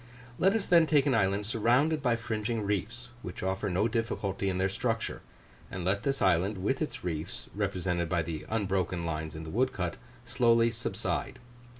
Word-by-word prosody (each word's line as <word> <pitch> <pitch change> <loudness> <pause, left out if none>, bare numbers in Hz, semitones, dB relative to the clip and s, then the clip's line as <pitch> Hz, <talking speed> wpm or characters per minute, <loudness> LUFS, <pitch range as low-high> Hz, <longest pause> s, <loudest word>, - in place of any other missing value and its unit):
Let 190 +2 +4
us 220 - 0
then 170 -2 +5
take 150 -3 +4
an 140 - +3
island 100 -2 +2
surrounded 125 +8 +2
by 120 -4 +2
fringing 115 -1 -2
reefs, 110 +5 -2
which 90 - -7
offer 95 +2 -1
no 95 +5 +2
difficulty 105 -4 -1
in 90 - -1
their 95 +1 +2
structure; 115 +3 -2 0.5
and 90 -2 -5
let 100 +2 +1
this 135 +3 0
island 95 +2 +3
with 120 - -1
its 155 - -3
reefs, 85 0 -4
represented 90 -4 -1
by 85 -1 +1
the 80 -1 -5
unbroken 95 -5 0
lines 80 -1 -3
in 80 - -6
the 80 - -7
woodcut, 105 -7 0 0.3
slowly 115 -1 +3
subside. 115 0 -2
105 Hz, 175 wpm, -30 LUFS, 90-120 Hz, 0.5 s, then